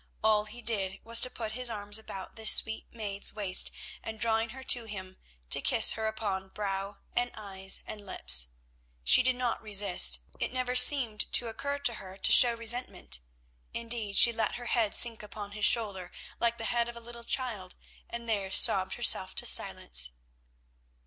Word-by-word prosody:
All 215 Hz, -1 st, +2 dB
he 240 Hz, +3 st, -10 dB
did 195 Hz, -4 st, -2 dB
was 230 Hz, +1 st, +2 dB
to 255 Hz, -, +2 dB
put 225 Hz, -3 st, -7 dB
his 250 Hz, +2 st, -1 dB
arms 205 Hz, -1 st, 0 dB
about 195 Hz, -3 st, -10 dB
this 220 Hz, -1 st, +4 dB
sweet 220 Hz, 0 st, +3 dB
maid's 205 Hz, -4 st, +1 dB
waist, 195 Hz, -3 st, +4 dB, 0.3 s
and, 220 Hz, -1 st, -8 dB
drawing 225 Hz, 0 st, -1 dB
her 265 Hz, +3 st, -11 dB
to 245 Hz, -3 st, +2 dB
him, 190 Hz, -3 st, -9 dB, 0.3 s
to -, -, +5 dB
kiss -, -, +4 dB
her 220 Hz, 0 st, -4 dB
upon 200 Hz, -3 st, -5 dB
brow 200 Hz, 0 st, -5 dB, 0.2 s
and 245 Hz, 0 st, -1 dB
eyes 195 Hz, -2 st, -4 dB
and 210 Hz, -1 st, -10 dB
lips. 65 Hz, -, +3 dB, 0.6 s
She 60 Hz, -, +5 dB
did 255 Hz, 0 st, 0 dB
not 245 Hz, -2 st, -3 dB
resist; 195 Hz, -, +2 dB, 0.2 s
it -, -, -3 dB
never 255 Hz, 0 st, -4 dB
seemed 250 Hz, -4 st, +4 dB
to 235 Hz, -, +2 dB
occur 280 Hz, +5 st, -5 dB
to 280 Hz, -4 st, -1 dB
her 190 Hz, -3 st, -11 dB
to -, -, +1 dB
show 240 Hz, -2 st, +7 dB
resentment; 230 Hz, -, -3 dB, 0.6 s
indeed, 230 Hz, -3 st, -2 dB
she 235 Hz, -, +5 dB
let 225 Hz, -1 st, -2 dB
her 240 Hz, -, -9 dB
head 230 Hz, -3 st, 0 dB
sink 235 Hz, -2 st, +4 dB
upon 210 Hz, -1 st, -10 dB
his 210 Hz, +1 st, -2 dB
shoulder 200 Hz, -6 st, +1 dB, 0.3 s
like 235 Hz, 0 st, -1 dB
the 225 Hz, -, -7 dB
head 235 Hz, +1 st, -2 dB
of 235 Hz, -, -11 dB
a -, -, -8 dB
little 235 Hz, 0 st, -12 dB
child, 230 Hz, -8 st, -3 dB, 0.3 s
and 235 Hz, 0 st, -8 dB
there 200 Hz, -4 st, -3 dB
sobbed -, -, +2 dB
herself -, -, +2 dB
to -, -, +1 dB
silence. -, -, +1 dB
220 Hz, 180 wpm, -28 LUFS, 200-235 Hz, 0.6 s, show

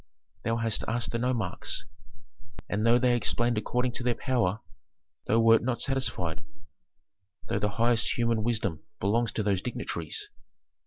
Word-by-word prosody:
Thou 115 Hz, 0 st, 0 dB
hast 115 Hz, -2 st, 0 dB
asked 120 Hz, +1 st, -1 dB
the 115 Hz, -, -1 dB
nomarchs, 115 Hz, -5 st, -1 dB, 0.8 s
and 105 Hz, +2 st, 0 dB
though 120 Hz, +1 st, +6 dB
they 125 Hz, 0 st, +3 dB
explained 120 Hz, -1 st, +1 dB
according 125 Hz, +3 st, 0 dB
to 125 Hz, -, -1 dB
their 120 Hz, -1 st, +1 dB
power, 115 Hz, -6 st, 0 dB, 0.7 s
thou 110 Hz, -, +3 dB
wert 115 Hz, 0 st, +6 dB
not 120 Hz, 0 st, -1 dB
satisfied, 115 Hz, -, -1 dB, 1.1 s
though -, -, 0 dB
the 105 Hz, -, +1 dB
highest 115 Hz, 0 st, +2 dB
human 115 Hz, -2 st, +1 dB
wisdom 105 Hz, -8 st, -1 dB, 0.2 s
belongs 110 Hz, +3 st, +1 dB
to 110 Hz, -, -1 dB
those 100 Hz, -3 st, +1 dB
dignitaries. 415 Hz, -, -4 dB
115 Hz, 145 wpm, -28 LUFS, 110-120 Hz, 1.1 s, though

